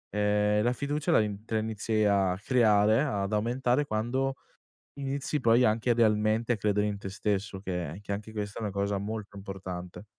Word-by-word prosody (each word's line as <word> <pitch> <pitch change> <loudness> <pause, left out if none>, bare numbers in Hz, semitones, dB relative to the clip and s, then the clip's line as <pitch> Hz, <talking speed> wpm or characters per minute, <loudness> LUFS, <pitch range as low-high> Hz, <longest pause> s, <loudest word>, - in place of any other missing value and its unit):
ehm, 105 0 +2
la 120 +1 +2
fiducia 145 +3 -3
la - - +6 0.3
te 115 - -7
la - - +3
inizi 110 0 -1
a 95 -2 +2
creare, 110 -2 +4
ad 105 -8 -1
aumentare 125 +5 +1
quando 130 +4 -1 0.6
inizi 140 +1 -2
poi 120 +2 +5
anche 110 +3 +1
idealmente 110 +1 +2
a - - -3
credere 105 0 +1
in 105 - -3
te 95 -1 -7
stesso, 100 -1 -2
che 90 -2 -4
che 100 0 -4
anche 105 +2 -6
questa 105 0 -5
è - - -5
una 105 - -2
cosa 100 +1 -1
molto 105 0 -5
importante. 95 -1 -7
105 Hz, 175 wpm, -29 LUFS, 100-115 Hz, 0.6 s, la